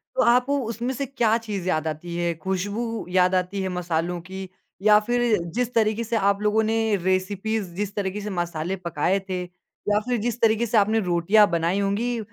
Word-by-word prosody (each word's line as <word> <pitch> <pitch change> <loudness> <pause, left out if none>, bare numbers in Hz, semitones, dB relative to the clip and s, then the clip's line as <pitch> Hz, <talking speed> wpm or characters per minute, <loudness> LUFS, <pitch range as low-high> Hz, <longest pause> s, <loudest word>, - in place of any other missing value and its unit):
तो - - +2
आपको 250 +4 +3
उसमें 235 +3 -3
से 275 +2 -3
क्या 235 -4 +1
चीज़ 205 -5 -5
याद 160 -2 0
आती 165 +3 -5
है? 170 -1 0
खुशबू 205 +6 -3
याद 185 0 +3
आती 185 +2 -1
है 190 - -2
मसालों 175 -1 -2
की 190 +1 -7 0.3
या 210 0 +6
फिर 240 -2 +2 0.2
जिस 245 0 -1
तरीके 220 0 +2
से 230 +1 -2
आप 200 -1 +2
लोगों 210 +1 +2
ने 220 -1 +1
रेसिपीज़, 190 +1 -1
जिस 205 +1 -3
तरीके 200 0 -2
से 210 - -4
मसाले 175 -1 -2
पकाए 175 +1 0
थे 185 -1 -2
या 180 +3 -3
फिर 245 -1 +1
जिस 235 +1 -2
तरीके 225 +1 +3
से 225 0 +1
आपने 215 +2 +3
रोटियाँ 190 +3 +4
बनाई 170 +3 +1
होंगी, 220 +5 0
200 Hz, 190 wpm, -24 LUFS, 180-225 Hz, 0.3 s, या